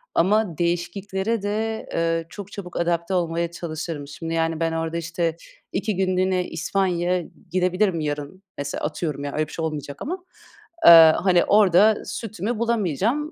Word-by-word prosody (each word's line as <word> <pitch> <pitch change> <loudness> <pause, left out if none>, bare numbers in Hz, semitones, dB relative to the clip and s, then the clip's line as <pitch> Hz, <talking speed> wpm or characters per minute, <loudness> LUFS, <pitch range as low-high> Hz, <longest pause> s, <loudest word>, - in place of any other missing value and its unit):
ama 195 -2 +2
değişikliklere 190 +5 -1
de, 220 +2 -2
ııı, 165 0 0
çok 200 +1 -9
çabuk 180 -4 -7
adapte 170 +1 0
olmaya 170 -1 0
çalışırım. 160 -3 -5
Şimdi, 165 +3 -6
yani, 165 0 0
ben 165 0 0
orada, 165 0 -2
işte, 170 0 -2 0.4
2 205 +2 -1
günlüğüne 185 -1 +1
İspanya'ya 180 0 0 0.3
gidebilirim 185 0 +1
yarın, 150 +5 -4
mesela 140 0 -4
atıyorum 150 -2 -3
ya 145 - -4
öyle 155 0 -1
bir - - -13
şey 165 - -2
olmayacak 145 -3 -5
ama. 360 +4 -5 0.6
Eee, 165 -2 +10
hani, 180 -2 +3
orada 205 +1 +5
sütümü 220 +1 -4
bulamayacağım. 235 - 0
175 Hz, 145 wpm, -23 LUFS, 165-200 Hz, 0.6 s, Eee